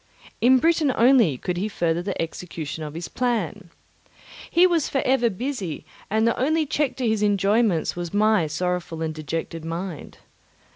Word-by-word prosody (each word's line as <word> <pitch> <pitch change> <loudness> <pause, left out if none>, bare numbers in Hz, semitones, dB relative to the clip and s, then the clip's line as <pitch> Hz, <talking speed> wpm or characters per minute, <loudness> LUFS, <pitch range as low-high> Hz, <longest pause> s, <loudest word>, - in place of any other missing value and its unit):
In 255 +2 +6
Britain 320 0 +2
only 230 - +4
could 175 +7 -3
he 195 +4 -1
further 170 -4 0
the 195 +1 -4
execution 165 -2 -5
of 150 0 -7
his 170 +1 -5
plan. 210 -7 -2 0.8
He 350 +2 +5
was 340 -5 +2
for 270 - 0
ever 255 -2 +3
busy, 200 - -4 0.2
and 220 +2 +2
the 230 - +2
only 310 +4 +2
check 285 -1 -1
to 255 -3 -1
his 220 -1 +1
enjoyments 205 -2 +2
was 175 -1 -5
my 215 -5 +3
sorrowful 170 +1 -3
and 160 -1 -2
dejected 160 +1 -5
mind. 165 0 -6
200 Hz, 160 wpm, -24 LUFS, 165-250 Hz, 0.8 s, In